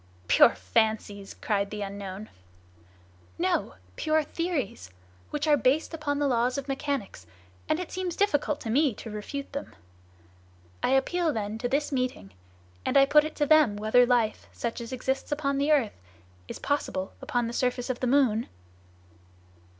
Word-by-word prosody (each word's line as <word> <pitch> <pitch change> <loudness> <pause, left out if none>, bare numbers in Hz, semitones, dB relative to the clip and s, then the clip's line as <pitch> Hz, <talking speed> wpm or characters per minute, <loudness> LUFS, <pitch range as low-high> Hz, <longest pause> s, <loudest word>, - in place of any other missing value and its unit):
"Pure - - +6
fancies!" 200 - -1
cried 200 -2 -1
the 210 -1 -4
unknown. 200 +1 -6 1.1
"No! - - 0 0.2
Pure 310 0 +1
theories! 290 - -3 0.4
which 300 0 -2
are 300 -1 +5
based 275 +5 +1
upon 300 -3 -2
the 290 - +1
laws 245 0 +1
of 280 0 -4
mechanics, 270 - -3 0.4
and 310 - +2
it 365 - -5
seems 370 -2 -3
difficult 300 -7 +1
to 225 - -3
me 275 -1 +3
to 225 - -8
refute 275 +7 -6
them. 280 - -6 1.1
I - - +1
appeal 325 +5 +2
then 215 -3 -3
to 245 - -2
this 290 +3 0
meeting, 255 - -2 0.5
and - - +2
I 275 - +7
put 295 +2 +5
it 310 - -6
to 295 - +1
them 300 -8 +5
whether 215 +4 +4
life, 235 -3 +1
such 235 0 -4
as 230 - -7
exists 265 +2 -2
upon 280 -2 0
the 285 +2 +2
earth, 250 - +1 0.5
is - - -6
possible 270 -9 -2 0.2
on 245 -1 +2
the 230 - -4
surface 250 0 0
of 245 - -6
the 255 - -1
moon?" 245 -4 +3
255 Hz, 160 wpm, -27 LUFS, 215-290 Hz, 1.1 s, I